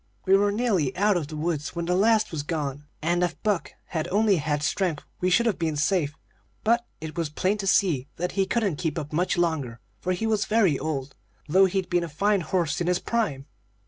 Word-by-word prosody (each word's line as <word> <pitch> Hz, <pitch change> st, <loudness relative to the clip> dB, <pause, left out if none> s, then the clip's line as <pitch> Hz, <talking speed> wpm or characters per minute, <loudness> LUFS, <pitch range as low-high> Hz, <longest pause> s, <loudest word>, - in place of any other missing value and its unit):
"We 190 Hz, 0 st, +5 dB
were 205 Hz, +1 st, +3 dB
nearly 200 Hz, -, 0 dB
out 205 Hz, +1 st, +3 dB
of 165 Hz, -5 st, -1 dB
the 155 Hz, -, -7 dB
woods 155 Hz, 0 st, -2 dB
when 170 Hz, 0 st, -2 dB
the 180 Hz, -, +1 dB
last 215 Hz, +2 st, +3 dB
was 160 Hz, -3 st, -2 dB
gone, 145 Hz, -2 st, -3 dB, 0.2 s
and 175 Hz, +2 st, +1 dB
if 175 Hz, -2 st, -2 dB
Buck 205 Hz, -7 st, 0 dB, 0.2 s
had 160 Hz, -3 st, -2 dB
only 205 Hz, 0 st, +3 dB
had 150 Hz, -1 st, -1 dB
strength 160 Hz, 0 st, 0 dB, 0.2 s
we 180 Hz, -, +1 dB
should 220 Hz, +6 st, +3 dB
have 225 Hz, -6 st, 0 dB
been 160 Hz, -2 st, 0 dB
safe. 150 Hz, -1 st, +1 dB, 0.5 s
But 235 Hz, +2 st, +2 dB
it 155 Hz, -1 st, -7 dB
was 165 Hz, -3 st, -1 dB
plain 190 Hz, +7 st, 0 dB
to 195 Hz, -, -3 dB
see 165 Hz, -10 st, +2 dB
that 180 Hz, +1 st, -2 dB
he 195 Hz, -1 st, 0 dB
couldn't 200 Hz, -7 st, 0 dB
keep 160 Hz, -2 st, -2 dB
up 150 Hz, -1 st, -5 dB
much 175 Hz, +3 st, +1 dB
longer, 150 Hz, -9 st, -1 dB, 0.2 s
for 185 Hz, -, -1 dB
he 200 Hz, +5 st, -2 dB
was 215 Hz, -2 st, +1 dB
very 205 Hz, -10 st, +3 dB
old, 140 Hz, -2 st, -3 dB, 0.3 s
though 190 Hz, +6 st, +5 dB
he'd 190 Hz, -1 st, -1 dB
been 175 Hz, -1 st, +1 dB
a 170 Hz, -, -5 dB
fine 200 Hz, +6 st, +1 dB
horse 170 Hz, -3 st, -1 dB
in 175 Hz, -, 0 dB
his 180 Hz, 0 st, +3 dB
prime. 170 Hz, -13 st, -1 dB
175 Hz, 220 wpm, -26 LUFS, 150-200 Hz, 0.5 s, We